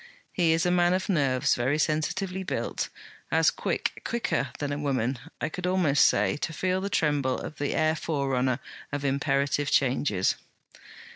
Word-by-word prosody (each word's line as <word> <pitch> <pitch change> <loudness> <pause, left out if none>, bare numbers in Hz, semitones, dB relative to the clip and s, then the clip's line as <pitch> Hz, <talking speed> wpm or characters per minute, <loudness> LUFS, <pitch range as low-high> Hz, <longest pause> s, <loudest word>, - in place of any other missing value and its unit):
He 170 -3 +3
is 165 +2 +1
a 180 - +3
man 175 0 +3
of 190 - -3
nerves, 135 -8 +2
very 130 +5 +1
sensitively 170 +5 -1
built; 190 - -3 0.4
as - - +4
quick - - -2
quicker 225 - -1
than 145 -1 -3
a 145 - -2
woman, 130 -3 -1 0.2
I - - -1
could 180 +3 -4
almost 175 -6 +4
say, 100 +6 +2
to 155 - -3
feel 185 +3 0
the 200 - -2
tremble 145 -7 +1
of 155 - -7
the 145 - -1
air 155 0 +2
forerunner 135 -5 0 0.3
of 145 -1 -3
imperative 140 +1 +1
changes.' 125 -7 +2
145 Hz, 160 wpm, -27 LUFS, 135-175 Hz, 0.4 s, as